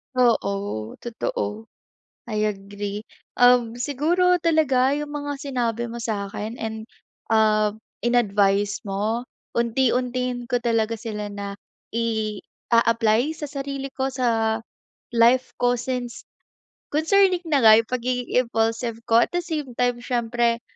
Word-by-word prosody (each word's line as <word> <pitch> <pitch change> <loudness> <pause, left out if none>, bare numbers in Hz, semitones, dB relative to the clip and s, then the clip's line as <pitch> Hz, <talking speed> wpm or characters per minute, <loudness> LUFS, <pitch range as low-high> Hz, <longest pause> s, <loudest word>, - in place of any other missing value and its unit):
Oo, 200 - 0
totoo, 235 - -3 0.6
I 215 -1 0
agree. 205 0 -4 0.4
Uhm, 245 -2 +5
siguro 310 +8 +2
talaga 300 -6 +3
yung 295 0 -3
mga 290 0 -4
sinabi 240 -4 -2
mo 235 - -6
sa'kin 210 -1 -4
and 220 -1 -4 0.5
ah 215 -1 +3 0.3
in-advice 205 -4 +2
mo 215 +5 -1 0.3
unti-untiin 250 +1 0
ko 245 0 -1
talaga 230 -1 +1
sila 215 -2 -5
na 200 0 -6 0.3
i-aapply 230 +2 0
sa 300 -2 -6
sarili 275 -1 -4
ko, 265 0 -3
sa 225 -3 +1 0.5
life 240 +2 +3
ko 245 0 +2
since 245 0 -4 0.7
concerning 365 +3 +3
na 290 - +4
nga 220 -2 +7
yung 225 - -24
pagiging 250 0 -2 0.2
impulsive 225 0 -1
ko 225 - +6
at 235 - +2
the 350 - +1
same 300 -7 -4
time 245 0 +1
siyempre 235 -1 0
235 Hz, 120 wpm, -23 LUFS, 220-255 Hz, 0.7 s, nga